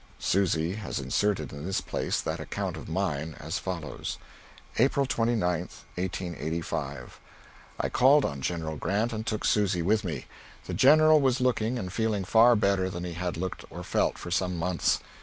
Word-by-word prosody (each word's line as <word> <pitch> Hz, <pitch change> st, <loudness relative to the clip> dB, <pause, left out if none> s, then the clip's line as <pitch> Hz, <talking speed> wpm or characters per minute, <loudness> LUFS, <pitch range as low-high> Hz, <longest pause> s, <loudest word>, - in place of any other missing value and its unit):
Susy 85 Hz, -3 st, +1 dB
has 105 Hz, -4 st, -4 dB
inserted 100 Hz, -10 st, 0 dB
in 70 Hz, 0 st, -7 dB
this 95 Hz, +3 st, -1 dB
place -, -, -2 dB
that -, -, -3 dB
account -, -, -3 dB
of -, -, -8 dB
mine 80 Hz, -4 st, -2 dB
as 80 Hz, +4 st, -3 dB
follows: 85 Hz, -5 st, -4 dB, 0.6 s
April 135 Hz, +3 st, +3 dB
29, 115 Hz, -6 st, +1 dB
1885. 85 Hz, -2 st, -5 dB, 0.6 s
I -, -, +1 dB
called 135 Hz, +3 st, +5 dB
on 70 Hz, -1 st, -3 dB
General 80 Hz, -1 st, -2 dB
Grant 110 Hz, +9 st, 0 dB
and 110 Hz, 0 st, -4 dB
took 110 Hz, -1 st, -1 dB
Susy 100 Hz, -5 st, +2 dB
with 105 Hz, +4 st, +2 dB
me. 80 Hz, -8 st, -4 dB, 0.4 s
The -, -, -5 dB
General 155 Hz, +2 st, +6 dB
was 130 Hz, -1 st, +2 dB
looking 125 Hz, -1 st, +1 dB
and 95 Hz, -5 st, -5 dB
feeling 110 Hz, -3 st, 0 dB
far 115 Hz, +5 st, +6 dB
better 100 Hz, -3 st, +2 dB
than 90 Hz, -1 st, -5 dB
he 90 Hz, -1 st, -4 dB
had 90 Hz, 0 st, -3 dB
looked 95 Hz, +1 st, -4 dB
or -, -, -7 dB
felt -, -, 0 dB
for 85 Hz, -, -7 dB
some 90 Hz, 0 st, 0 dB
months. 85 Hz, +1 st, +1 dB
95 Hz, 165 wpm, -28 LUFS, 85-110 Hz, 0.6 s, General